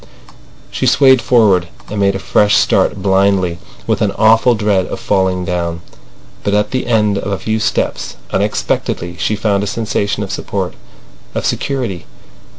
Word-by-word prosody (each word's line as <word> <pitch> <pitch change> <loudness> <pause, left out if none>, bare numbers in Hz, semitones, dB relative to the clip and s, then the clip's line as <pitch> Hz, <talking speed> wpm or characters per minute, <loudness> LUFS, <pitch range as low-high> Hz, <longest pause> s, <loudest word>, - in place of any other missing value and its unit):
She - - -1
swayed 130 -3 +5
forward, 100 -8 +3 0.2
and 105 - -5
made 100 -1 +2
a - - 0
fresh 105 +2 +2
start 95 - +1
blindly, 95 -3 +2 0.3
with 110 -1 0
an 105 -2 +2
awful 115 +3 +4
dread 105 -4 +1
of - - -5
falling 95 -2 0
down; 85 -1 -2 0.6
but 100 - 0
at 105 0 0
the 130 -2 -2
end 105 -4 +2
of 100 - -4
a 100 - -1
few 110 +4 -2
steps, 120 +3 -2 0.2
unexpectedly, 85 0 -1
she 110 - 0
found 100 -1 0
a - - -3
sensation 105 -1 -2
of 95 - -6
support, 95 -1 -3 0.6
of - - -2
security. 120 -11 -2
100 Hz, 155 wpm, -15 LUFS, 95-110 Hz, 0.6 s, swayed